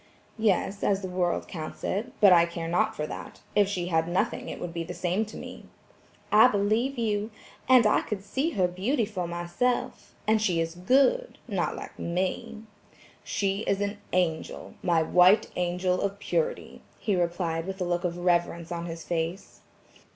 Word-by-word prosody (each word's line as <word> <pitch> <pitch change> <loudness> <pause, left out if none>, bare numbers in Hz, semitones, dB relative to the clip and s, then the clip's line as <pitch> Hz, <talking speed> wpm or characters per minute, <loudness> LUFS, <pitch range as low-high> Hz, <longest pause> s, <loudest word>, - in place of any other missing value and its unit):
"Yes, 205 -1 +1
as 200 0 +1
the - - -2
world 180 -1 -1
counts 155 -3 -7
it, 220 +6 -2
but 200 -3 +8
I 170 -1 +6
care 170 -1 -5
not 215 +6 +1
for 150 - -2
that; - - -8
if 205 -2 +5
she 180 -4 -2
had 165 -1 +1
nothing 175 +2 -1
it - - -6
would 175 -1 -5
be 170 -1 -3
the 165 - -7
same 185 +5 0
to 215 - -10
me." - - -9 0.7
"I 220 +3 +8
believe 220 +5 +1
you. 215 -2 0 0.4
And 255 -3 +7
I 210 - +4
could 200 -3 -5
see 265 +10 -1
her 185 -2 +2
beauty 215 +8 0
for 185 -4 -4
myself; 175 +9 -2
and 220 0 +3
she 180 -6 +1
is 165 0 -1
good, 275 - +2
not - - -1
like - - -9
me." 200 +6 -2 0.6
"She 195 -1 -1
is 195 - +1
an 205 0 -2
angel, 175 -3 -1
my 170 -2 +2
white 180 +5 +5
angel 180 +1 0
of 200 0 -2
purity," 485 - -2 0.2
he 205 - 0
replied 170 -1 -1
with 195 0 -5
a 180 - -1
look 175 0 -1
of 175 -1 -2
reverence 170 -1 0
on 170 0 -3
his 165 -1 -6
face. 170 +2 -3
185 Hz, 180 wpm, -27 LUFS, 175-210 Hz, 0.7 s, but